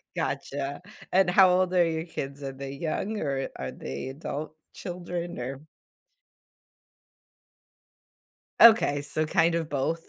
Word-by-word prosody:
Gotcha. 140 +3 -3 0.3
And 185 -1 +4
how 190 +1 +7
old 185 0 +2
are 175 -2 +4
your 160 0 -2
kids? 140 -4 -6
Are 135 -1 -4
they 135 0 -7
young, 170 +9 -3
or 135 -2 -2
are - - -4
they 65 - -6
adult-children? 170 +4 -6
Or 130 +3 -5 3.0
Okay, 220 -11 +7
so 155 +2 -2
kind 165 +2 +3
of 165 -2 -1
both, 160 +4 -1
155 Hz, 120 wpm, -27 LUFS, 140-175 Hz, 3.0 s, how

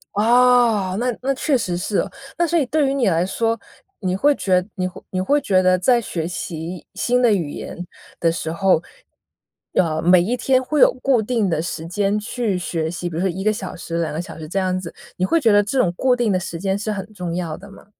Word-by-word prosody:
哦。 230 -3 +4
那 245 0 0
那 275 +1 0
确 270 +1 +1
实 180 -7 -2
是 195 +3 -2
哦。 - - -2 0.3
那 345 - +2
所 340 - +1
以 300 - +2
对 285 +2 +2
于 270 - 0
你 265 -5 +1
来 170 0 +1
说， 225 +4 -1 0.4
你 185 -2 -1
会 290 +9 +3
觉 185 -5 +1
你 185 -1 -1
会 180 - -10
你 185 - -2
会 285 +10 +2
觉 185 -6 +3
得 185 0 +4
在 240 +7 +3
学 165 -7 -3
习 170 0 -6
新 245 +5 +1
的 240 -3 +4
语 165 -7 -1
言 - - -7 0.4
的 165 -1 +2
时 160 -1 -4
候， 185 -1 +2 0.9
呃， 160 -3 +1
每 180 +1 +5
一 235 +8 -1
天 260 +1 +2
会 300 +3 -1
有 - - +6
固 260 -4 +3
定 220 -3 0
的 160 -1 0
时 165 -1 -5
间 200 +3 0
去 210 -2 -2
学 165 -2 -2
习， 175 +1 -4
比 165 - -8
如 - - -1
说 190 - +1
1 190 +2 -4
个 215 - +3
小 200 -3 -5
时、 170 0 -4
2 165 -2 -2
个 160 - -2
小 175 - -10
时 155 - -7
这 175 - -4
样 185 -1 0
子， 175 -3 -8 0.2
你 185 - +1
会 330 - +2
觉 230 -5 +4
得 205 0 +6
这 210 +7 -3
种 185 -9 +3
固 255 -1 +3
定 240 -4 +1
的 185 - +2
时 180 -2 -5
间 195 +2 0
是 215 +1 -2
很 205 +1 -5
重 180 -4 -4
要 170 -3 -3
的 200 +3 -13
吗？ 195 - -15
195 Hz, 255 characters per minute, -21 LUFS, 175-240 Hz, 0.9 s, 有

